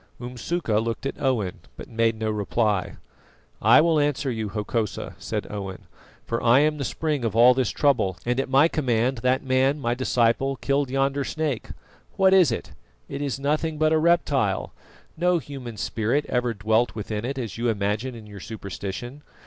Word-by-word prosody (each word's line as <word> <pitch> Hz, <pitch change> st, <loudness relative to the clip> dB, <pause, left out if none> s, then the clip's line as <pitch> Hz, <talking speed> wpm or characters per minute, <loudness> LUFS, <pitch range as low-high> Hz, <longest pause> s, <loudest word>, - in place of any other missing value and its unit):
Umsuka 125 Hz, 0 st, -2 dB
looked 115 Hz, +3 st, -4 dB
at 135 Hz, -, -4 dB
Owen, 115 Hz, -9 st, 0 dB, 0.2 s
but -, -, -9 dB
made 115 Hz, 0 st, +1 dB
no 110 Hz, -1 st, -1 dB
reply. 105 Hz, 0 st, 0 dB, 0.7 s
"I 115 Hz, +6 st, +7 dB
will 165 Hz, -1 st, +3 dB
answer 145 Hz, -2 st, 0 dB
you, 110 Hz, -3 st, -3 dB
Hokosa," 105 Hz, 0 st, -3 dB
said -, -, -3 dB
Owen, 100 Hz, -2 st, -6 dB, 0.4 s
"for 115 Hz, -, -2 dB
I 120 Hz, +3 st, +5 dB
am 150 Hz, 0 st, +1 dB
the -, -, -1 dB
spring 150 Hz, +1 st, -2 dB
of 110 Hz, -2 st, -1 dB
all 120 Hz, +2 st, +7 dB
this 125 Hz, -3 st, 0 dB
trouble, 115 Hz, -, +1 dB
and 125 Hz, +2 st, 0 dB
at 135 Hz, -, -1 dB
my 135 Hz, +4 st, +5 dB
command 125 Hz, -5 st, 0 dB
that 130 Hz, +3 st, +1 dB
man, 135 Hz, +2 st, +2 dB
my 120 Hz, -3 st, 0 dB
disciple, 125 Hz, +1 st, +1 dB
killed 140 Hz, 0 st, 0 dB
yonder 135 Hz, +1 st, 0 dB
snake. 150 Hz, -4 st, -3 dB, 0.4 s
What 190 Hz, 0 st, +4 dB
is 185 Hz, -5 st, +6 dB
it? -, -, -4 dB, 0.4 s
It 140 Hz, -, -5 dB
is 140 Hz, -2 st, -2 dB
nothing 150 Hz, +3 st, -1 dB
but 155 Hz, +1 st, +3 dB
a 160 Hz, -, +4 dB
reptile; 145 Hz, -, +1 dB, 0.4 s
no 180 Hz, +1 st, +3 dB
human 135 Hz, -7 st, -7 dB
spirit 115 Hz, +8 st, 0 dB
ever 125 Hz, -2 st, 0 dB
dwelt 110 Hz, +4 st, +1 dB
within 105 Hz, 0 st, -4 dB
it 135 Hz, +3 st, -3 dB
as 115 Hz, -4 st, -5 dB
you 120 Hz, 0 st, +1 dB
imagine 110 Hz, +4 st, -1 dB
in 110 Hz, -2 st, -10 dB
your 105 Hz, -1 st, -10 dB
superstition. 105 Hz, +5 st, -6 dB
125 Hz, 175 wpm, -24 LUFS, 110-140 Hz, 0.7 s, I